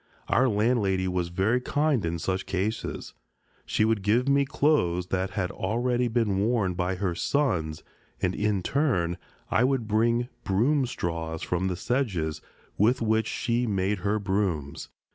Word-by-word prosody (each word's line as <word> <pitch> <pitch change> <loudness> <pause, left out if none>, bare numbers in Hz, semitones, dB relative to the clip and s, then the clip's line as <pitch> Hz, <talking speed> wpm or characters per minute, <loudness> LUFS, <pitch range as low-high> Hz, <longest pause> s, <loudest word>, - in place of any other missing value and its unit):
Our 130 +1 +4
landlady 105 -4 +1
was 90 -1 -1
very 95 +8 +1
kind 145 -2 +1
in 85 0 -1
such 95 +3 -2
cases. 100 +4 -3 0.5
She 110 - +2
would 110 -2 +1
give 115 +6 +2
me 140 0 +4
clothes 90 - +1
that 95 0 0
had 90 -3 0
already 120 +5 0
been 110 -4 +1
worn 105 -3 +1
by 90 +1 -1
her 95 -1 -1
sons, 85 - 0 0.4
and 90 - 0
in 105 -3 0
turn 90 - 0 0.3
I 120 - +3
would 130 -3 +1
bring 115 +3 +2 0.2
broom 130 +8 +2
straw 85 -8 -3
from 90 +3 -1
the 90 - -1
sedges, 90 - -1 0.4
with 115 +4 +3
which 110 0 +1
she 120 +1 -1
made 100 -1 0
her 100 +3 0
brooms. 95 -8 -2
105 Hz, 150 wpm, -27 LUFS, 90-120 Hz, 0.5 s, Our